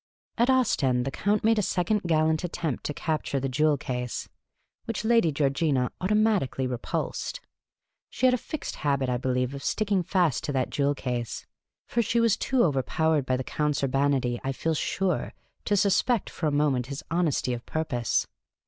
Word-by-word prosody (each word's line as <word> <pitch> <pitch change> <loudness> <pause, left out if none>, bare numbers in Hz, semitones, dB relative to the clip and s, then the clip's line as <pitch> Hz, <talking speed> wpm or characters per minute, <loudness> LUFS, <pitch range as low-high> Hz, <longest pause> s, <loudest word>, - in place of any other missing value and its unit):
At 235 +3 +2
Ostend 135 - +2
the 135 - -2
Count 205 +7 0
made 225 0 +4
a - - +3
second 205 +2 0
gallant 155 0 +2
attempt 170 -5 -3
to 150 - -2
capture 155 -4 -1
the 135 - -1
jewel 150 +3 +2
case, 125 -3 -4 0.6
which 230 -2 -3
Lady 230 -8 +4
Georgina 140 -2 +1
automatically 205 - +1
repulsed. 125 - -3 0.7
She - - -1
had 255 - +6
a - - +3
fixed 310 +4 -6
habit, 140 -3 0
I 125 - +1
believe, 125 +1 -1
of 140 - -6
sticking 205 -3 +1
fast 175 -5 +1
to - - -2
that 130 -2 0
jewel 145 0 +1
case; 125 -4 -4 0.4
for 235 - 0
she 235 +1 +1
was 230 -2 +4
too 260 -2 +1
overpowered 150 0 +1
by 130 - +1
the 130 - -3
Count's 150 +1 -1
urbanity, 135 -3 +1
I 135 - -1
feel 160 +6 -1
sure, 180 +4 -1 0.3
to 205 - +2
suspect 200 +4 +2
for 160 - -2
a - - +1
moment 145 -4 +1
his 140 0 -6
honesty 165 -7 +1
of 120 0 -5
purpose. 130 -7 0
150 Hz, 175 wpm, -27 LUFS, 130-200 Hz, 0.7 s, had